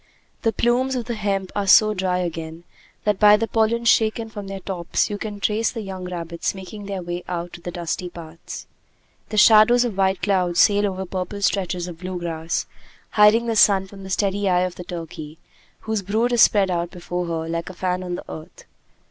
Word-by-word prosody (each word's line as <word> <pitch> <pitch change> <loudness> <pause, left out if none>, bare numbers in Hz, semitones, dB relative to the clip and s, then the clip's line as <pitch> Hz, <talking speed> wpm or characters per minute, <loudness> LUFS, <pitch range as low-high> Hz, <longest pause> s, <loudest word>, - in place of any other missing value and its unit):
The 225 - +2
plumes 250 +3 +1
of 245 -2 -3
the 240 - -3
hemp 200 -3 -2
are 200 -1 -1
so 215 +2 +6
dry 185 -2 -1
again, 165 -2 -5 0.4
that 210 -2 +1
by 210 0 +7
the 225 +1 -1
pollen 230 +1 +1
shaken 225 0 +2
from 205 -2 -7
their 195 0 -6
tops 180 +1 -1
you 205 - -4
can 210 -1 -5
trace 215 +2 +1
the 230 - -5
young 190 -3 -6
rabbits 170 0 -4
making 195 +2 -9
their 195 -2 -4
way 175 +1 -5
out 175 0 -4
to 175 - -10
the 175 - -6
dusty 175 +1 -4
paths. 165 -1 -9 0.6
The 215 - -4
shadows 220 +3 +6
of 230 -5 -3
white 190 -1 +1
clouds 180 -4 +1
sail 205 0 +4
over 190 -1 -4
purple 190 +2 -5
stretches 180 -3 0
of 170 -2 -9
blue 185 0 -5
grass, 165 -1 -3 0.5
hiding 215 +2 +5
the 230 -1 -1
sun 195 -2 +5
from 195 +1 -13
the 190 - -8
steady 200 +1 0
eye 180 -1 +3
of 180 -1 -1
the 180 - -9
turkey, 165 -3 -8 0.4
whose 220 -2 -2
brood 220 +5 0
is 235 - +4
spread 195 -3 +5
out 170 -1 -1
before 175 -1 -4
her 165 -1 -3
like 165 +1 -3
a - - -8
fan 180 0 -1
on 180 -1 -4
the - - -8
earth. 155 0 -10
190 Hz, 205 wpm, -22 LUFS, 175-210 Hz, 0.6 s, by